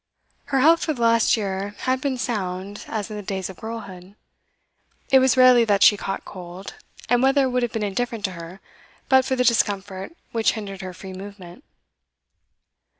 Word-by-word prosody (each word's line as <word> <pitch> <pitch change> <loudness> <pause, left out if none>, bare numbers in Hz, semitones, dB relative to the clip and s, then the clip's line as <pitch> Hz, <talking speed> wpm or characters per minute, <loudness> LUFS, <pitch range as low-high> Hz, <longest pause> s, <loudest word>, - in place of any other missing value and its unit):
Her 270 -2 +1
health 330 +4 +5
for 315 - 0
the 245 - -8
last 230 0 +4
year 200 0 -3
had 255 0 0
been 270 -2 -1
sound 200 -4 -4
as 215 -1 -4
in 210 - -5
the - - -5
days 190 -1 -4
of 185 - -16
girlhood; 200 -4 -8 1.0
it 265 - +7
was 260 -1 +3
rarely 255 -2 +7
that 200 -2 +3
she 210 - +7
caught 195 -1 -5
cold, 180 +1 -9 0.3
and 245 0 +3
weather 270 +1 +3
would 250 0 0
have 240 -2 -1
been 225 - -3
indifferent 225 +1 -2
to 190 - -2
her 170 +2 -10 0.5
but 265 -1 +5
for 260 -1 0
the 250 - +1
discomfort 205 - 0
which 225 -1 +1
hindered 195 -3 -7
her 185 -1 -7
free 190 +1 -9
movement. 195 +3 -10
210 Hz, 180 wpm, -23 LUFS, 190-250 Hz, 1.0 s, it